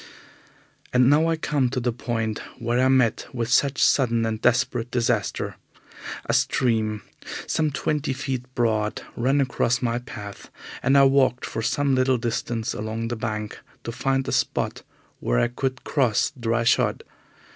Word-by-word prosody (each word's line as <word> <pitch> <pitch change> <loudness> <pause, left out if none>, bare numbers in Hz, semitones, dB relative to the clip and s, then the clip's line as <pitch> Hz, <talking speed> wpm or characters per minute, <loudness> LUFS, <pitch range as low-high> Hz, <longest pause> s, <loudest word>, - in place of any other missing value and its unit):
And 125 +1 +5
now 155 +3 +4
I 165 - +2
come 145 -5 0
to 130 +1 -2
the 120 -1 -1
point 115 -2 -2 0.2
where 120 +1 0
I - - +5
met 130 -4 +2
with 120 -2 -2
such 140 +3 +3
sudden 115 -4 +3
and 110 0 -2
desperate 120 -1 +1
disaster. 120 -4 -1 0.7
A - - 0
stream, 110 -4 +1 0.4
some 155 -1 +1
twenty 150 +1 -1
feet 130 -1 -3
broad, 110 -3 0
ran 135 +4 +2
across 125 -2 +1
my 120 -1 0
path, 105 -4 -9 0.3
and 135 +3 +4
I 140 - +7
walked 135 -2 +3
for - - -4
some 140 +4 +1
little 130 0 +3
distance 115 -1 -2
along 110 +2 -4
the 120 - -2
bank 105 -2 -4 0.2
to 115 - -4
find 135 +2 0
a - - -1
spot - - -1 0.4
where - - 0
I 120 - +2
could 130 +1 -3
cross 125 -8 +1
dry 115 -2 0
shod. 115 - +2
120 Hz, 155 wpm, -24 LUFS, 115-135 Hz, 0.7 s, I